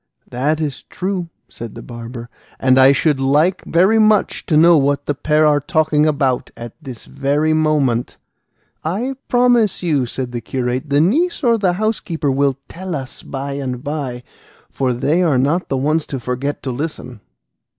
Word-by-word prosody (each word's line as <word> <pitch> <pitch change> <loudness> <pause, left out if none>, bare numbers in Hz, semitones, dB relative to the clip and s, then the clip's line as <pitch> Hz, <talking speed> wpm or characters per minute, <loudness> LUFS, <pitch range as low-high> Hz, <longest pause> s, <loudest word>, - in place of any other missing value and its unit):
"That 145 +6 0
is 150 -3 -3
true," 185 -2 -4 0.2
said 115 -2 -9
the - - -9
barber, 120 0 -8 0.3
"and 130 0 +4
I 130 +1 +7
should 140 0 +1
like 150 +7 +2
very 190 +6 +3
much 215 -1 +2
to 155 - +3
know 170 +2 +7
what 140 -1 +1
the 145 - 0
pair 150 +2 +2
are 150 -1 +4
talking 155 0 +1
about 140 -4 0
at 120 -1 -8
this 130 -6 -9
moment." 145 -3 0 0.7
"I 215 +12 -2
promise 245 -5 +2
you," 145 -7 +1
said 125 +1 -5
the 120 -1 -4
curate, 130 +3 -3
"the 145 +1 +3
niece 305 - +1
or 230 -2 +3
the 185 -3 +2
housekeeper 180 -7 -1
will 135 0 +1
tell 185 -1 -6
us 135 -2 -7
by 140 0 -5
and 130 -3 -4
by, 140 -5 -4 0.5
for 130 -2 0
they 145 +8 +1
are 160 -7 +2
not 145 +8 0
the 135 - 0
ones 150 +4 0
to 135 - -4
forget 125 +4 -3
to 130 - -3
listen." 125 -3 -5
145 Hz, 170 wpm, -18 LUFS, 130-170 Hz, 0.7 s, I